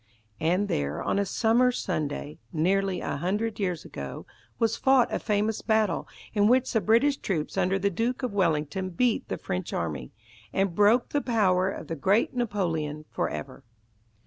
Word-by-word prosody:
And 180 +5 +1
there, 70 - -2
on 200 - 0
a 200 - 0
summer 240 +4 +3
Sunday, 155 -8 -3
nearly 185 +3 +1
a - - -3
hundred 210 +8 -1
years 180 -5 -2
ago, 70 -1 -7 0.3
was 225 -1 +1
fought 265 -2 +3
a - - 0
famous 210 0 0
battle, 220 -5 +1 0.3
in 205 -2 +4
which 255 +2 +3
the 225 - +3
British 235 +7 +3
troops 160 -6 -3
under 190 +2 +2
the 200 +1 0
Duke 235 +8 -1
of 245 -5 -2
Wellington 170 -1 0
beat 225 +6 +1
the - - -3
French 90 0 -4
army, 75 -7 -3 0.4
and 195 -2 0
broke 210 +6 +4
the 290 - 0
power 190 -7 +2
of 190 - -6
the 165 - -4
great 195 +9 +2
Napoleon 165 -11 -2
for - - -1
ever. - - -7
195 Hz, 170 wpm, -27 LUFS, 165-225 Hz, 0.4 s, in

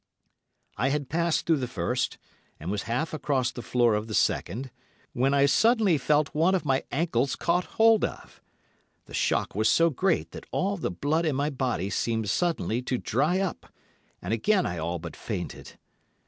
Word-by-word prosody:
I 125 +5 +1
had 140 -2 -2
passed 170 0 0
through 165 -2 +3
the 130 -2 -2
first, 90 -8 -2 0.4
and 85 +5 -4
was 105 -1 -2
half 150 +8 -1
across 135 -5 0
the 120 - -7
floor 120 -2 +2
of 105 +1 -1
the 110 - -3
second, 125 +7 0 0.4
when 130 +3 +2
I 140 0 +4
suddenly 210 - +3
felt 150 +2 +1
one 165 +6 +3
of 180 - -2
my 135 -1 +1
ankles 140 -4 0
caught 175 +1 0
hold 225 -1 +5
of. - - -5 0.6
The - - -14
shock - - 0
was 110 +2 +2
so 165 0 +4
great 175 +6 0
that - - -10
all 200 +2 0
the 170 - -2
blood 150 - 0
in 150 - 0
my 145 +2 0
body 125 -8 -2
seemed 110 -1 -1
suddenly 165 -9 0
to 125 0 -2
dry 150 +11 +1
up, 190 -3 -4 0.5
and 90 +5 -2
again 185 - +2
I 85 - -3
all 85 +2 -2
but 85 -1 -8
fainted. - - -6
140 Hz, 180 wpm, -27 LUFS, 115-170 Hz, 0.6 s, hold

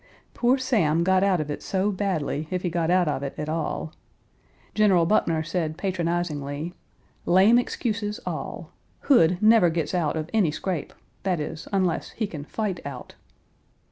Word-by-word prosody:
Poor 250 +2 +2
Sam 205 - +2
got 190 +1 +3
out 195 -3 +3
of 150 -1 -3
it - - -5
so 195 +2 0
badly, 165 -6 -2
if 185 -1 -2
he 175 - -1
got 170 -1 0
out 180 -1 +3
of 145 -2 -1
it 140 -1 -5
at 150 - -4
all. 155 0 -3 0.8
General 195 -6 +4
Buckner 165 -4 +2
said 160 -1 -2
patronizingly, 170 -4 -2 0.5
"Lame 195 +7 +6
excuses, 210 -4 -2
all. - - -5 0.3
Hood 180 - +4
never 215 -4 +6
gets 165 0 -2
out 165 -4 0
of 155 0 -3
any 210 -7 +3
scrape 165 +1 -4 0.3
that 180 -3 0
is, 155 +1 -5
unless 185 -4 0
he 225 - -2
can 155 -8 -7
fight 205 0 -3
out." 140 - -8
175 Hz, 160 wpm, -25 LUFS, 160-200 Hz, 0.8 s, Lame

